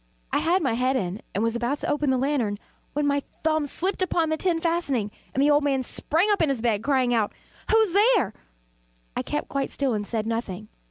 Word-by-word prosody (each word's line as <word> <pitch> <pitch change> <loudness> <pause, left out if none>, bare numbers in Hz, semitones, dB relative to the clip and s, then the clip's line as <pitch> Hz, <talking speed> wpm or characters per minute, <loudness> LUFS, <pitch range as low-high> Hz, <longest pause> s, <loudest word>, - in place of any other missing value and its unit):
I - - +3
had 350 +2 +2
my 260 -5 +1
head 255 +3 +1
in, 195 -3 -2
and 205 - +1
was 230 0 0
about 240 +4 -1
to - - -4
open 295 -1 +1
the 260 - +3
lantern, 255 -6 0 0.4
when 295 0 0
my 285 0 +2 0.2
thumb 310 -2 +1
slipped 375 +7 -2
upon 340 -3 +1
the 315 - +1
tin 345 -1 +1
fastening, 305 -11 0 0.2
and 270 - +1
the 295 - +5
old 290 0 +4
man 270 -2 +1
sprang 335 - +1
up 405 - +2
in 315 - +3
bed, 220 -3 +1
crying 260 -2 +2
out 220 -3 +1 0.4
"Who's 440 -5 +4
there?" 415 - +4 0.8
I - - 0
kept 295 - -3
quite 275 -1 -2
still 275 -3 0
and 205 -1 -2
said 220 -2 -2
nothing. 215 -3 -4
275 Hz, 215 wpm, -25 LUFS, 230-320 Hz, 0.8 s, the